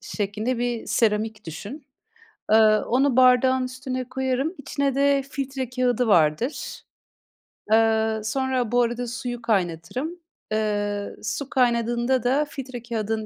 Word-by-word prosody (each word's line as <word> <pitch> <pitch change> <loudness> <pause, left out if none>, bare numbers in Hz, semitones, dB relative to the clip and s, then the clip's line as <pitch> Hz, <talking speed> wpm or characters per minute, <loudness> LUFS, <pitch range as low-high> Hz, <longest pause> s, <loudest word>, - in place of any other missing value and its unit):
şeklinde 215 +4 -3
bir 240 -1 -2
seramik 215 -1 0
düşün. 205 - -8 0.7
Eee, 220 - +7 0.3
onu 265 +2 +2
bardağın 255 0 +5
üstüne 255 0 -5
koyarım. 265 +5 -1
İçine 280 -1 -2
de 280 0 +3
filtre 270 -3 -4
kâğıdı 250 -1 +1
vardır. 175 - +1 0.9
Eee, 220 0 +3
sonra 255 +1 -1
Bu 245 0 +4
arada 240 +1 -1
suyu 240 0 -5
kaynatırım. 205 - -2 0.3
Eee, 205 -1 -1
su 250 +6 -3
kaynadığında 240 0 +1
da 275 +5 +2
filtre 255 -5 -7
kâğıdının 220 -2 -2
245 Hz, 120 wpm, -24 LUFS, 220-260 Hz, 0.9 s, Eee